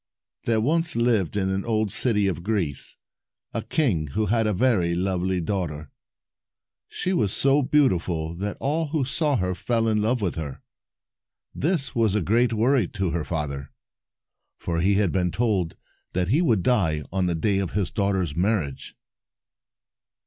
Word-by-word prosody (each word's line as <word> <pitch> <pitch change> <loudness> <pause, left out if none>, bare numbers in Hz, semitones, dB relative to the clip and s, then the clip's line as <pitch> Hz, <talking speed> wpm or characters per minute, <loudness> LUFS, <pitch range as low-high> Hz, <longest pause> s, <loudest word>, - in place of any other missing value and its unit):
There 115 -1 +2
once 160 +7 +1
lived, 115 -6 +1
in 95 -1 0
an 95 0 -1
old 110 -3 0
city 105 -3 +1
of 90 -3 -1
Greece, 90 -8 -1 0.6
a - - -1
king 100 - 0
who 110 - +2
had 110 +1 +1
a - - +2
very 95 -6 +2
lovely 95 0 0
daughter. 80 -5 -3 1.0
She 185 - -2
was 105 - +1
so 140 +5 +4
beautiful 90 - +1
that 100 +2 -4
all 155 +3 0
who 145 -2 -1
saw 145 +2 +1
her 90 -5 0
fell 115 +4 0
in 105 -1 +2
love 120 +4 +1
with 100 -5 -1
her. 75 -4 -6 0.9
This 150 -5 0
was 110 -4 +2
a 105 - +2
great 115 +6 +2
worry 115 -1 +2
to 95 -4 -2
her 85 -2 -1
father, 70 -4 -4 0.9
for 85 -1 -2
he 100 +3 +3
had 100 -4 +2
been 90 -2 +1
told 100 -5 0 0.4
that 90 0 0
he 145 +9 +3
would 115 - +2
die 80 - +1
on 95 -2 +1
the 85 - 0
day 100 +4 +1
of 95 -3 -3
his 100 -2 -1
daughter's 95 -6 0
marriage. 90 -7 -1
100 Hz, 165 wpm, -24 LUFS, 90-120 Hz, 1.0 s, so